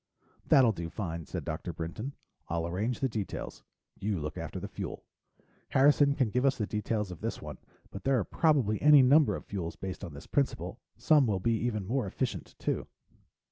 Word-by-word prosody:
"That'll 130 -4 +6
do 85 -4 -5
fine," 85 -5 -5
said - - -5
Dr. 80 +2 -4
Brinton. 85 - -5 0.4
"I'll 85 0 -1
arrange 105 +8 -2
the 135 - +3
details. 110 -5 -5 0.4
You 100 -2 -1
look 75 0 -4
after - - -5
the - - -5
fuel. - - -6 0.6
Harrison 140 +1 +5
can 130 -7 +1
give 125 +3 +1
us 140 -1 +3
the 105 - -1
details 105 -1 -2
of 90 - -9
this - - -3
one, - - -8 0.3
but 100 - -8
there 135 -1 +3
are 110 - +1
probably 140 -10 +2
any 150 -2 +8
number 145 +4 +5
of - - -7
fuels 85 -5 -4
based 95 -1 -6
on 75 - -7
this 70 - -10
principal. 140 -2 -1 0.2
Some 150 -5 +4
will 100 -3 +1
be 115 +5 +1
even 110 -3 -1
more 120 +2 0
efficient, - - -3
too." - - -2
110 Hz, 190 wpm, -30 LUFS, 90-135 Hz, 0.6 s, any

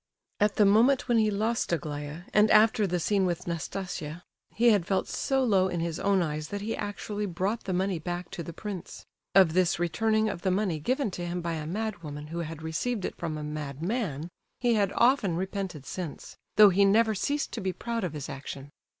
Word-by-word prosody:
At 210 0 +2
the 210 - +5
moment 235 +7 +4
when 235 -2 +3
he 215 -1 +3
lost 220 +2 0
Aglaya, 150 -1 -3
and 210 +1 +5
after 215 -1 +5
the 180 -1 0
scene 195 +3 +1
with 180 -1 -1
Nastasia, 170 -1 -4 0.3
he 235 +1 +4
had 195 -5 +2
felt 195 - 0
so 270 -1 0
low 195 -6 +3
in 175 -2 -2
his 165 -1 -2
own 195 -2 +2
eyes 155 -1 -3
that 205 +3 -5
he 220 +2 -2
actually 205 0 -4
brought 195 +6 -2
the 190 - -2
money 185 -1 0
back 175 +1 -5
to - - -5
the 170 - -6
prince. 190 +1 -7 0.3
Of 185 -5 +6
this 185 -1 +2
returning 220 +6 +1
of 175 -5 -4
the 190 - +1
money 185 -4 0
given 255 - 0
to 175 -1 -5
him 175 +1 -2
by 170 -1 -2
a 155 -2 -4
madwoman 170 -7 -4
who 170 +1 -4
had 160 -1 -5
received 190 +7 -2
it - - -4
from 160 -3 -4
a 150 - -5
madman, 155 - -3 0.3
he 240 -1 +2
had 200 -3 +2
often 235 -8 +3
repented 185 -5 -4
since—though 185 +5 +2
he 195 +2 +4
never 220 +3 +4
ceased 285 +8 -1
to 230 - -4
be 190 -1 -1
proud 235 +4 -3
of 175 -4 -2
his 145 -3 -5
action. 140 0 -7
185 Hz, 205 wpm, -28 LUFS, 165-215 Hz, 0.3 s, Of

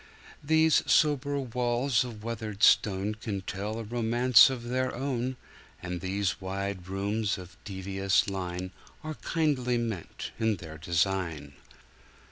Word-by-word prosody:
These 160 +1 +4
sober 145 -2 +3
walls 125 0 +1
of 115 -4 -8
weathered 110 -3 -5
stoneCan 105 -1 +2
tell 105 +3 -4
a 115 - -4
romance 120 +2 +5
of 130 -3 -4
their 130 +2 -1
own, 130 -1 -2 0.4
And 90 -1 -5
these 95 +1 -1
wide 95 -1 -4
rooms 100 +2 -1
of 90 -3 -11
devious 95 0 0
line 90 -1 -4 0.3
Are 155 0 -4
kindly 130 -2 0
meant 115 -7 -4
in 110 -1 +2
their 80 -3 -10
design. 85 -3 -1
110 Hz, 120 wpm, -29 LUFS, 95-125 Hz, 0.4 s, romance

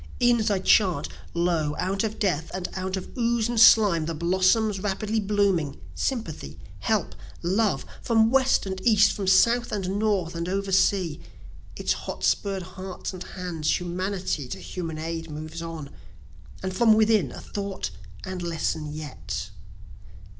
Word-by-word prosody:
E'en 240 -1 +4
as 215 0 +1
I 200 - +2
chant, 190 -1 +3 0.3
lo! 170 -4 +1
out 195 +3 -1
of 220 -1 -2
death, 165 -6 0
and 185 -1 -3
out 190 0 -3
of 185 - -8
ooze 235 -2 +1
and 240 -1 -1
slime, 205 -8 +6
The 165 - -2
blossoms 190 +5 +2
rapidly 210 +2 -1
blooming, 200 -8 +1
sympathy, 155 - -3 0.2
help, - - 0 0.3
love, 200 +4 +1 0.2
From 225 -1 +3
West 265 -3 +3
and 190 -1 -4
East, 210 -3 +5
from 195 -2 -4
South 235 +6 +4
and 195 -1 -2
North 200 -6 0
and 170 +1 -3
over 195 +1 -2
sea, 185 -4 +2 0.6
Its - - 0
hot - - -7
spurr'd 195 -2 +1
hearts 185 +1 -7
and 185 - -8
hands 175 -5 -2
humanity 180 -4 -3
to 125 - -5
human 165 -4 -5
aid 165 +1 -4
moves 155 +2 -6
on; 165 -4 -6 0.7
And 185 0 -3
from 225 0 +5
within 215 - +3
a - - -8
thought 200 -1 -4 0.3
and 185 -1 -5
lesson 160 -2 -2
yet. 150 -2 -6
190 Hz, 155 wpm, -26 LUFS, 165-210 Hz, 0.7 s, slime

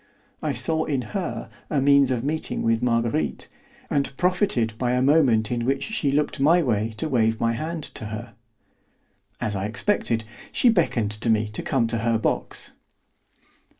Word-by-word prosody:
I 155 - -1
saw 150 +5 0
in 135 -4 -1
her 195 -4 -3 0.2
a 150 - +1
means 140 0 +5
of 125 -2 -1
meeting 155 +3 -1
with 115 0 +1
Marguerite, 115 -10 0 0.4
and 140 -1 -1
profited 180 - +1
by 125 -1 +1
a 125 - +2
moment 130 -7 +3
in 120 -1 -1
which 135 +2 0
she 155 -10 -1
looked 145 0 0
my 165 +5 +4
way 110 -3 -1
to 160 - -1
wave 110 -5 +1
my 115 0 +1
hand 160 +5 -4
to - - -4
her. 110 +2 -7 1.1
As 105 -4 -2
I 95 +1 -2
expected, 115 - 0 0.3
she 250 - +4
beckoned 125 - +1
to 105 +3 -1
me 110 -1 +2
to 105 - -3
come 130 -4 +1
to 115 0 -1
her 115 0 +1
box. 110 - -3
125 Hz, 170 wpm, -24 LUFS, 115-150 Hz, 1.1 s, means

